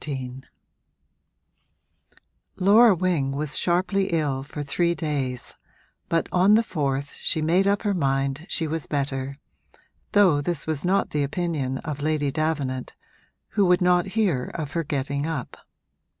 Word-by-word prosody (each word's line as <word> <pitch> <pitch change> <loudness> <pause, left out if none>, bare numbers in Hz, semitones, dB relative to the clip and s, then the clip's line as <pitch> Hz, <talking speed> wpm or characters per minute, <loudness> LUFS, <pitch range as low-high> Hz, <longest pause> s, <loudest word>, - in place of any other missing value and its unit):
XIII 130 -3 -5 2.1
Laura 205 +3 +6
Wing 165 -7 0
was 150 +1 -3
sharply 185 +3 +1
ill 150 -7 0
for 145 +2 -6
three 170 +4 0
days, 140 -6 -3 0.6
but 165 0 +1
on 190 +4 +5
the 225 - +4
fourth 140 -7 -2
she 160 - -1
made 175 +5 +2
up 200 +1 +1
her 205 -2 +1
mind 135 -1 -1
she 165 - -1
was 160 0 -3
better, 140 -1 -2 0.8
though 185 -8 +5
this 160 0 -2
was 155 -3 -2
not 190 +2 +1
the 150 - 0
opinion 145 -3 -2
of 150 -2 -4
Lady 150 -2 0
Davenant, 145 -4 -2 0.5
who 205 - +1
would 180 0 +4
not 180 0 +3
hear 175 - +2
of 150 -4 -4
her 165 +2 -1
getting 140 0 -2
up. 145 -7 -4
155 Hz, 140 wpm, -24 LUFS, 140-180 Hz, 2.1 s, Laura